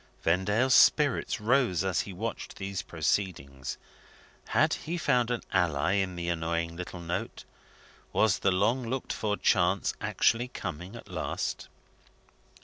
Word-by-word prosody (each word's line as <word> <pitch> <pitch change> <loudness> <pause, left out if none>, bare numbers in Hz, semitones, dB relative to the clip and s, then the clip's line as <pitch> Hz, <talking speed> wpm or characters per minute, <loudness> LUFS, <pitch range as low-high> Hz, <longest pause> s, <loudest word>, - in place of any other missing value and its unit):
Vendale's 105 +9 +2
spirits 145 -2 +4
rose 110 -6 +2
as 95 -2 +1
he 100 - -7
watched 110 +5 -5
these 95 -1 -3
proceedings. 75 -6 -2 0.7
Had - - +3
he 170 +3 -3
found 125 -7 +2
an 120 -1 -2
ally 85 -4 +2
in 95 -2 -1
the 85 0 -4
annoying 85 0 -1
little 90 0 -7
note? 85 +1 -4 0.7
Was 110 -3 +3
the 100 - +2
long 115 +8 +2
looked 130 +1 -2
for 105 -1 -1
chance 95 0 +2
actually 120 +2 +2
coming 90 -3 -6
at 115 - -10
last? - - -3
95 Hz, 135 wpm, -29 LUFS, 85-115 Hz, 0.7 s, spirits